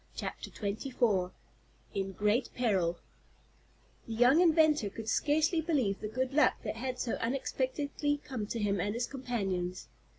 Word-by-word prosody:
CHAPTER - - -5
XXIV 210 -3 0 0.6
IN 195 -1 -2
GREAT 210 +6 +1
PERIL 190 -8 +1 1.1
The 230 - -4
young 245 +8 +5
inventor 315 - +4
could 220 +2 -8
scarcely 315 +7 +2
believe 270 - 0
the 215 - -3
good 255 +4 -2
luck 300 - +4
that - - -4
had 255 +1 -3
so 245 - -2
unexpectedly 275 +3 -1
come 230 -7 -4
to 230 - -3
him 200 -3 0
and 205 +3 -1
his 240 +1 0
companions. 195 -10 -3
240 Hz, 140 wpm, -31 LUFS, 205-275 Hz, 1.1 s, young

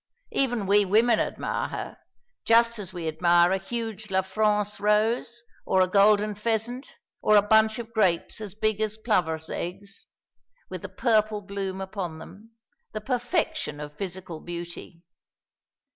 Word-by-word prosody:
Even 245 -6 0
we 205 +2 +4
women 220 +4 +3
admire - - -2
her, - - -6 0.5
just 230 0 +4
as 190 -3 -6
we 175 -3 -5
admire 175 +2 +4
a 190 - +1
huge 220 +1 -5
La 190 0 +1
France 210 +1 0
rose, 225 +3 +1 0.2
or 190 - +1
a 185 - +4
golden 205 +2 +4
pheasant, 230 - -3 0.3
or 215 - +4
a 205 - +8
bunch 220 +1 +4
of 230 -1 -8
grapes 190 -2 +1
as 205 -3 -6
big 215 0 0
as 215 0 -1
plovers' 165 -8 0
eggs, 200 +3 -6 0.6
with - - -5
the - - -7
purple 215 -3 +1
bloom 195 -1 -4
upon 190 -4 -5
them; 200 +7 -13 0.4
the 215 - -3
perfection 250 - -1
of 150 0 -8
physical 180 -2 -6
beauty. 170 0 -8
210 Hz, 145 wpm, -26 LUFS, 185-220 Hz, 0.6 s, a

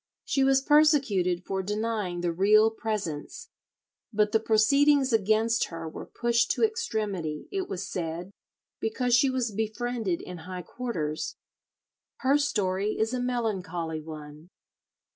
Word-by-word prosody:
She 270 - +1
was 270 0 +4
persecuted 270 - +3
for 190 0 -2
denying 210 -3 -2
the 175 -1 0
Real 210 +5 +5
Presence, 215 - -4 0.6
but 210 -1 +2
the 220 - +3
proceedings 270 +5 +4
against 220 +2 +2
her 165 -1 -7
were 160 - -8
pushed 235 0 +1
to - - -1
extremity, 210 - -1
it 385 -1 -3
was 190 0 -4
said, 175 +2 -4 0.5
because 240 +2 +1
she 270 +2 +4
was 255 -3 -1
befriended 220 -3 -2
in 180 -1 -8
high 180 +2 -7
quarters. 165 -13 -4 0.9
Her 275 +2 +3
story 205 -6 0
is 220 +3 0
a 255 - -1
melancholly 185 -10 -2
one. 155 +1 -10
215 Hz, 130 wpm, -27 LUFS, 180-245 Hz, 0.9 s, Real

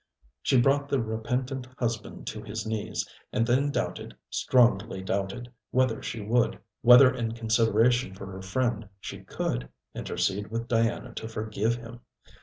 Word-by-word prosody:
She 130 - +3
brought 140 +3 +3
the 140 - +2
repentant 125 +4 -2
husband 115 -3 -3
to 110 - -5
his 110 +1 -5
knees, 110 -1 -2 0.2
and 115 - +1
then 130 +4 +2
doubted, - - -3 0.2
strongly 115 -5 +3
doubted, 110 +5 -3 0.2
whether 130 -3 +1
she 115 - -4
would, 115 +4 +2 0.2
whether 125 +2 +8
in 115 -3 -2
consideration 115 -1 +2
for 95 - -8
her 95 -1 -8
friend 110 +1 -1
she - - -7
could, - - -3 0.2
intercede 100 +2 -1
with 115 +1 -3
Diana 115 0 0
to 110 - -5
forgive 110 0 -1
him. 120 0 -9
115 Hz, 145 wpm, -28 LUFS, 105-125 Hz, 0.2 s, whether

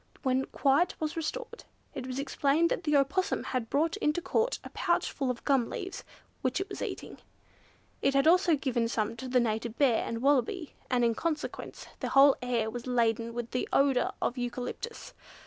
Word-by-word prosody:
When 260 -1 +1
quiet 285 +5 +1
was 310 -1 -2
restored, 465 +9 -4 0.3
it 255 -1 -5
was 255 0 -4
explained 290 +3 +1
that - - -2
the 300 -1 +2
Opossum 290 +8 +1
had 245 -4 -3
brought 320 +6 +1
into 300 -4 +1
Court 450 +7 0
a - - -9
pouch - - 0
full 270 -3 -2
of 245 -2 -4
gum 270 -5 +2
leaves, 380 +1 -6 0.4
which 255 +5 0
it 385 - -3
was 390 - -7
eating. - - -5 0.8
It 275 - +2
had 275 +1 +4
also 345 0 +5
given 250 -5 0
some 225 -1 -1
to 260 - -6
the 250 0 +3
Native 225 0 -1
Bear, 260 -6 +3
and 230 +1 -4
Wallaby, 285 +4 +1 0.2
and 245 -2 +2
in 230 - +3
consequence 310 +4 -4
the - - -2
whole 275 0 +7
air 240 -3 0
was 240 +1 -6
laden 230 -1 +1
with 240 -1 -4
the 250 - -2
odour 275 -2 +3
of 250 - -1
eucalyptus. 250 - -5
270 Hz, 185 wpm, -30 LUFS, 240-310 Hz, 0.8 s, whole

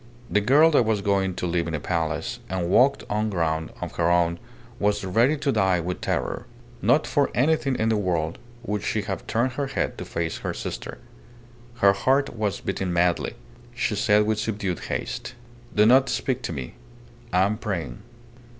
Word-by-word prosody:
The 105 - +3
girl 145 +9 +5
that 140 - +4
was 110 -2 0
going 95 -2 +1
to - - -3
live 85 -1 0
in 80 - -2
a - - -2
palace 80 0 -2
and 90 -1 -2
walk 140 +5 +4
on 105 +1 0
ground 80 -4 -1
of - - -6
her 85 0 +2
own 85 -1 +2 0.4
was 105 0 +1
ready 115 +11 +3
to 140 -1 0
die 95 -6 +2
with 90 +2 -4
terror. - - -2 0.3
Not - - +3
for - - +1
anything 140 0 +2
in 110 -1 +1
the 110 - +2
world 85 -5 -1 0.2
would 105 -3 -2
she 110 0 -1
have 95 - -5
turned 120 +3 +1
her 140 +2 -2
head 135 - -2
to - - -5
face 85 -1 -3
her - - -4
sister. - - -6 0.9
Her 100 - +7
heart 130 +7 +1
was 105 -3 -2
beating 95 -2 -2
madly. 85 0 +1 0.4
She 125 -4 0
said 105 +1 +3
with 110 0 0
subdued 100 -5 -2
haste - - -4 0.4
"Do 105 - +5
not 130 +3 +5
speak 130 -1 -1
to - - -3
me. 65 -5 -6 0.6
I 90 +1 +4
am 105 +3 0
praying." 85 - -4
100 Hz, 185 wpm, -25 LUFS, 85-115 Hz, 0.9 s, Her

